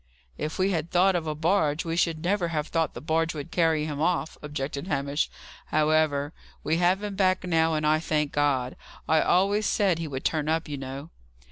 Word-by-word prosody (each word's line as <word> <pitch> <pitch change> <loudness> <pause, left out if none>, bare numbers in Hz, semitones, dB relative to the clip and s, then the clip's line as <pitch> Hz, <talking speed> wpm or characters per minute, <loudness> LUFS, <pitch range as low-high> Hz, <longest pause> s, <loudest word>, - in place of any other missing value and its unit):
"If 155 - -4
we 190 +1 +2
had 165 -2 -2
thought 185 +2 +3
of 165 -2 -2
a 155 - -2
barge, 160 -1 +1
we 165 0 -2
should 165 -2 0
never 180 0 +1
have 155 -2 -2
thought 165 -1 0
the - - -7
barge 165 +1 0
would 150 +2 -6
carry 160 -3 +2
him 150 -1 -4
off," 170 -1 0
objected 145 +1 -4
Hamish. 140 -2 -1 0.4
"However, 155 -1 +1 0.3
we 160 - +1
have 180 +3 +2
him 205 -1 -4
back 185 -1 +2
now, 165 -2 +2
and 155 0 -1
I 155 +1 +3
thank 150 -2 -1
God. 135 -4 0 0.3
I 160 0 +4
always 200 +4 +2
said 195 -6 +2
he 165 - -3
would 135 -2 -6
turn 155 -1 0
up, 160 +1 0
you 145 -1 -4
know." 135 +4 -7
160 Hz, 205 wpm, -26 LUFS, 150-175 Hz, 0.4 s, I